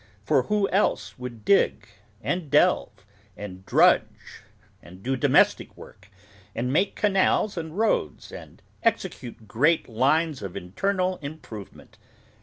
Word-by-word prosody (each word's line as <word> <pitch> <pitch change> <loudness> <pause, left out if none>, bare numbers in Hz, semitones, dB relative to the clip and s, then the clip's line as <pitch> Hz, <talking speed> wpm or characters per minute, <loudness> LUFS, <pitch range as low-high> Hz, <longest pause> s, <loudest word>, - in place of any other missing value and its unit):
For 130 - +3
who 200 +9 0
else 195 -8 0
would 120 -4 -8
dig, 200 - +2 0.4
and 175 -4 -2
delve, 145 - +2 0.3
and 95 -2 -8
drudge, - - +2 0.4
and 90 +2 -15
do 130 +2 0
domestic 130 - +2
work, 100 +1 -15 0.5
and 125 +3 -2
make 190 +6 +1
canals 200 0 +2
and 160 0 -6
roads, 220 +1 -1
and - - -12 0.2
execute 170 - -2
great 150 +10 +2
lines 140 +6 +1
of 100 -3 -6
Internal 185 - -1
Improvement! 140 -9 -10
145 Hz, 120 wpm, -25 LUFS, 110-185 Hz, 0.5 s, For